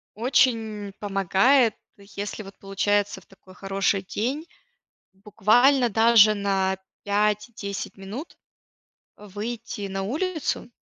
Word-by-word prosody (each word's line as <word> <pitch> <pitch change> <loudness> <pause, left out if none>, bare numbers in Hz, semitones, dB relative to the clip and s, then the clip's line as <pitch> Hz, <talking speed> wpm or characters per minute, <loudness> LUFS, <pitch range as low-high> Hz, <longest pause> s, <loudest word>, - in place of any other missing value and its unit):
очень 225 -4 +1
помогает, 205 +5 +3 0.2
если 200 +1 -7
вот 195 0 -13
получается 200 0 0
в - - -23
такой 190 -1 -19
хороший 195 0 0
день, 255 - -3 0.7
буквально 230 +6 +3
даже 220 -1 +5
на 195 -1 0 0.3
5-10 210 0 -2
минут, 205 - -8 0.8
э, 210 - -13
выйти 205 0 -5
на 195 0 -4
улицу 315 - -2
205 Hz, 100 wpm, -24 LUFS, 195-235 Hz, 0.8 s, даже